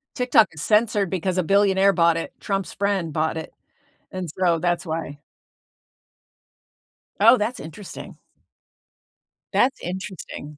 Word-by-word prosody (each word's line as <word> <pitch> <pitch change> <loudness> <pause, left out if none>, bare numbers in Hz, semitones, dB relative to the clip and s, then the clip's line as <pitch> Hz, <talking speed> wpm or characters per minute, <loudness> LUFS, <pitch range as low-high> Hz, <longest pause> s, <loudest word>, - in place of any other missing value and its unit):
TikTok 250 -4 +4
is 155 - -8
censored 210 -1 +2
because 185 0 -2
a 185 - +2
billionaire 195 +1 +3
bought 170 -2 +3
it. 165 - -5
Trump's 195 -1 -3
friend 195 -6 -1
bought 160 +1 -1
it, 160 - -7 0.6
and 185 -2 -5
so 175 -3 +2
that's 175 +2 -1
why. 160 -3 -4 2.0
Oh, - - +7
that's 225 +3 -2
interesting. 165 +6 -10 1.4
That's 260 +2 +2
interesting. 180 -5 -7
185 Hz, 120 wpm, -23 LUFS, 165-200 Hz, 2.0 s, Oh